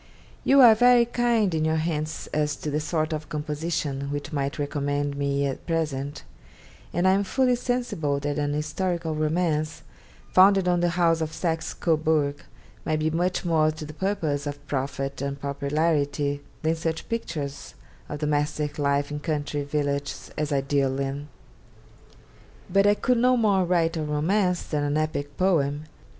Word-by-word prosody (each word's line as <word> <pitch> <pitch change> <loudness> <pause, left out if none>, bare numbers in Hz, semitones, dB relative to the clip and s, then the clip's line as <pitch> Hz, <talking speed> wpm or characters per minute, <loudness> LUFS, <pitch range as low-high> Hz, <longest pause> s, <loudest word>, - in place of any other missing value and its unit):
'You 275 0 +6
are 235 -3 +9
very 245 +1 +5
kind 235 -5 +1
in 160 -1 0
your 160 0 +1
hints 155 -1 -2
as 150 -1 +1
to 150 - -5
the 150 - 0
sort 155 +1 -1
of 155 0 -5
composition 150 -2 -3
which 145 +2 -4
might 140 -1 -2
recommend 145 0 -1
me 140 0 0
at 135 -1 -4
present, 145 -4 -2 0.7
and 175 +2 +1
I - - +6
am 195 +1 +2
fully 250 +5 +2
sensible 240 - -1
that 145 0 -2
an 145 0 0
historical 160 +2 -2
romance, 155 0 -1 0.5
founded 195 0 +6
on 175 -1 +3
the 175 0 +2
House 165 -2 +3
of 160 -1 -2
Saxe 165 -1 -2
Cobourg, 155 -3 +1 0.5
might 155 - 0
be 155 +1 0
much 180 +3 0
more 160 -2 +3
to 155 0 -6
the 150 - -9
purpose 155 -6 -1
of 145 0 -6
profit 135 -1 -3
or 140 0 -2
popularity 145 0 -1 0.2
than 160 +1 +2
such 160 0 -3
pictures 155 -11 -4 0.3
of 150 0 -5
domestic 150 0 -1
life 140 0 +1
in 150 - -3
country 145 -1 -2
villages 140 -1 -2
as 150 0 -2
I 140 -1 +2
deal 135 -1 0
in. 140 +1 -3 1.5
But 195 +1 +5
I 205 - +5
could 250 +2 +1
no 250 +1 +4
more 200 -5 +3
write 170 -1 +1
a - - -1
romance 175 +5 +1
than 150 -2 -2
an 145 +1 0
epic 145 -2 -2
poem. 150 -6 +1
155 Hz, 165 wpm, -25 LUFS, 145-175 Hz, 1.5 s, are